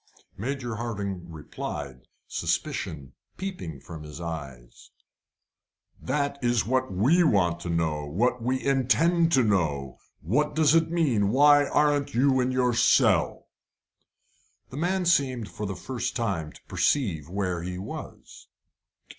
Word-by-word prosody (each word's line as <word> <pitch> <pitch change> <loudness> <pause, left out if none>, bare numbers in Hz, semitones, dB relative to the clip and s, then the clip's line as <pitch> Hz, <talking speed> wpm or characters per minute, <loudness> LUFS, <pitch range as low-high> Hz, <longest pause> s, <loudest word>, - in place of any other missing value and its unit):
Major 120 0 -4
Hardinge 100 -6 -4
replied, 75 -4 -7 0.2
suspicion 70 -3 -3 0.2
peeping 180 - -6
from 80 +3 -10
his 75 0 -9
eyes: 70 -8 -8 1.1
"That 140 0 -2
is 120 -2 +2
what 130 0 0
we 130 - +3
want 90 - +2
to 85 - -6
know, 80 -3 -1
and 75 +2 -9
what 125 +4 +1
we 130 +3 -1
intend 165 +6 +3
to 130 - +5
know 75 - 0 0.2
what 125 - 0
does 155 -1 +4
it 165 -1 +3
mean? 135 -12 +1
Why 145 +4 +5
aren't 145 -3 +1
you 130 +1 +3
in 125 0 +1
your 125 -1 +1
cell?" 115 - +3 1.2
The 130 - -7
man 180 +3 0
seemed 130 -9 +1
for 105 - -5
the 95 - -4
first 125 +6 -4
time 95 -10 -2
to - - -17
perceive 85 - 0
where 90 -2 -2
he 90 +1 -5
was. 95 +3 -9
115 Hz, 135 wpm, -26 LUFS, 85-140 Hz, 1.2 s, to